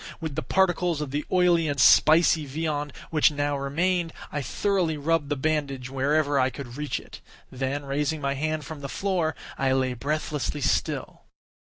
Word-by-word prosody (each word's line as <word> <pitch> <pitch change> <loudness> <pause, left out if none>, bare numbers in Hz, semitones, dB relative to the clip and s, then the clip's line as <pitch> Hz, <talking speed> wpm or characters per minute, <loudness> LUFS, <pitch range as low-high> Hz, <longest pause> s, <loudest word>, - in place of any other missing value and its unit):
With 160 -3 -4
the 155 - -2
particles 175 -2 +1
of 150 -3 -4
the 145 +1 -1
oily 175 -3 +3
and 145 -2 -2
spicy 155 +3 +5
viand 150 0 -2 0.2
which 155 -1 +5
now 145 -1 -1
remained, 165 +5 0 0.2
I 145 - -2
thoroughly 175 - 0
rubbed 150 0 0
the 145 - 0
bandage 140 -3 -2
wherever 145 +1 +1
I 130 0 +3
could 125 -2 -9
reach 150 0 -3
it; - - -13 0.3
then, 135 +2 -3
raising 150 +3 -1
my 140 -1 -1
hand 155 +1 -2
from 155 0 -8
the 140 - -5
floor, 180 -4 -1 0.2
I 135 -1 +2
lay 130 -1 +1
breathlessly 150 +2 -2
still. - - -1
150 Hz, 170 wpm, -26 LUFS, 140-160 Hz, 0.3 s, spicy